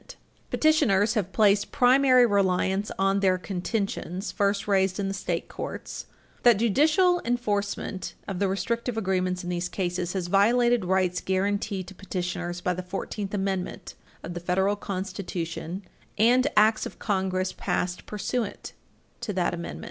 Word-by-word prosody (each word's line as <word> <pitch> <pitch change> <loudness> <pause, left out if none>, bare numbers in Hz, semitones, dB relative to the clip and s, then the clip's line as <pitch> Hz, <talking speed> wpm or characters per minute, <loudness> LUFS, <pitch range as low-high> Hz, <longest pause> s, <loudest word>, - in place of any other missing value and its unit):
[Footnote - - -13
3] - - -32 0.3
Petitioners 230 -10 +3
have 200 -5 -1
placed 205 -1 +3
primary 255 0 +5
reliance 195 -1 +1
on 195 +1 +2
their 190 -2 +3
contentions, 195 0 -3
first 200 0 0
raised 190 -1 +2
in 195 - -1
the 195 - -2
state 180 -3 -3
courts, - - -6 0.3
that 240 -4 +6
judicial 315 - +3
enforcement 205 -5 -2
of 190 -3 -4
the 200 - +2
restrictive 230 +4 -2
agreements 185 -3 0
in 175 - -3
these 175 0 -2
cases 180 -1 -2
has 190 -3 -2
violated 235 +4 +3
rights 185 -1 +1
guaranteed 195 0 -1
to 195 - -10
petitioners 180 -2 -4
by 180 - 0
the 180 - -4
Fourteenth 195 +2 -4
Amendment 195 -2 -3 0.3
of 170 - -6
the 175 - -4
Federal 190 +3 +1
Constitution 185 -2 -5 0.3
and 245 +5 +4
Acts 215 +1 +4
of - - -12
Congress 190 -2 -1
passed 180 0 -2
pursuant 215 +1 -3 0.5
to 210 - -4
that 180 -2 0
Amendment. 170 0 -5
195 Hz, 150 wpm, -26 LUFS, 185-215 Hz, 0.5 s, that